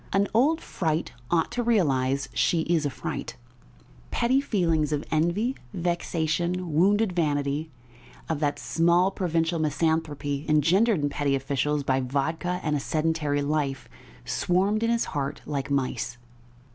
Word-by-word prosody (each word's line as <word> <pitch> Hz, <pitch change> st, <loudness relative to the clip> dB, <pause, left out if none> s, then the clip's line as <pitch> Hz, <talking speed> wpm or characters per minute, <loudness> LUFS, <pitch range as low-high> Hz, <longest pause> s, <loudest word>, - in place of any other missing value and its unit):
An 200 Hz, +1 st, +2 dB
old 295 Hz, +8 st, +3 dB
fright 160 Hz, -2 st, -2 dB, 0.2 s
ought 165 Hz, -2 st, +1 dB
to 245 Hz, -, -1 dB
realise 140 Hz, -, +1 dB
she 170 Hz, -, +2 dB
is 160 Hz, -2 st, +1 dB
a -, -, -1 dB
fright!" 130 Hz, -, -5 dB, 0.7 s
Petty 255 Hz, +3 st, +2 dB
feelings 165 Hz, -, +1 dB
of 150 Hz, 0 st, -1 dB
envy, 175 Hz, +11 st, +1 dB, 0.2 s
vexation, 170 Hz, 0 st, -1 dB
wounded 200 Hz, +6 st, +3 dB
vanity, 145 Hz, -2 st, 0 dB, 0.6 s
of 160 Hz, -3 st, -1 dB
that 145 Hz, -1 st, 0 dB
small, 170 Hz, +3 st, +2 dB
provincial 165 Hz, -3 st, 0 dB
misanthropy 150 Hz, -2 st, -1 dB
engendered 170 Hz, -, +3 dB
in 145 Hz, -, +1 dB
petty 140 Hz, -1 st, 0 dB
officials 140 Hz, +2 st, -1 dB
by 135 Hz, -1 st, +1 dB
vodka 160 Hz, +7 st, -1 dB
and 150 Hz, -1 st, 0 dB
a -, -, 0 dB
sedentary 155 Hz, -1 st, 0 dB
life, 140 Hz, -3 st, -1 dB, 0.4 s
swarmed 195 Hz, +4 st, +1 dB
in 230 Hz, -, +1 dB
his 235 Hz, 0 st, +1 dB
heart 140 Hz, 0 st, -3 dB
like 140 Hz, -1 st, -3 dB
mice. 130 Hz, -3 st, -1 dB
160 Hz, 135 wpm, -26 LUFS, 145-180 Hz, 0.7 s, old